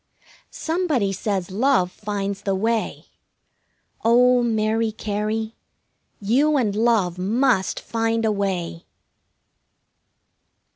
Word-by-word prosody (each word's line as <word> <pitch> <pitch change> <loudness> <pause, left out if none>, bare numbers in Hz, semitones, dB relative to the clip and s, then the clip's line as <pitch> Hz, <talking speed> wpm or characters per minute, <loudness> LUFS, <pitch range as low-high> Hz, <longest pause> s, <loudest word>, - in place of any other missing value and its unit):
Somebody 315 - -1
says 190 -2 -2
love 210 -4 +2
finds 200 -1 -4
the 195 -1 -1
way. 225 +3 -1 1.0
Oh, 245 +2 +5
Mary 220 -1 0
Cary, 215 +1 -3 0.7
you 275 +9 +2
and 215 -6 0
Love 210 -6 +1
must 225 +1 +1
find 225 0 -1
a 220 - +2
way! 185 -4 -3
220 Hz, 90 wpm, -22 LUFS, 195-235 Hz, 1.0 s, Oh